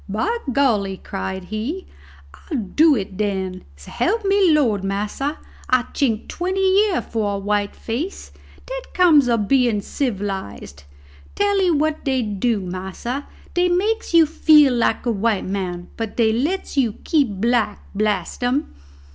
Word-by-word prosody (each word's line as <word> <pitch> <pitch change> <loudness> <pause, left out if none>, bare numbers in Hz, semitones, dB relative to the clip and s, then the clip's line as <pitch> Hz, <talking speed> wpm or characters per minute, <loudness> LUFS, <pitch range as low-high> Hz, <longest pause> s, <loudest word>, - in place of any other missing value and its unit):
"By 330 - 0 0.2
golly!" 215 -8 +1
cried 190 -1 -5
he, 220 - -4 0.5
"I'll 305 - -6
do 290 - +3
it 195 -4 -4
den. 190 -3 -2
S'elp 400 - -2
me 395 -1 +4
de 315 - +5
Lord, 215 -8 +1
massa, 210 +9 -2 0.3
I'd 255 -1 +1
chink 230 -6 0
twenty 370 +2 -2 0.3
year 375 - -1
for 210 -3 -2
a - - -2
white 205 0 -1
face. 280 - -5 0.3
Dat - - -8
comes 310 -8 +5
ob 225 -4 +1
bein' 245 -5 +3
civilized. 195 - -4 0.5
Tell'ee 400 -2 +2
what 310 -1 0
dey 265 -3 0
dew, 210 +1 -1
massa, 190 +9 -5 0.3
dey 355 0 +2
makes 420 +6 0
you 335 -1 +6
feel 300 -3 +5
like 235 -1 0
a 240 - +2
white 215 -1 0
man, 180 -2 -4
but 225 -2 -5
dey 220 -2 +3
lets 305 +12 -2
you 245 -6 +2
keep 285 -10 +1
black, 235 -1 +1
blast 205 0 -1
'em!" 260 +5 0
235 Hz, 145 wpm, -21 LUFS, 200-310 Hz, 0.5 s, you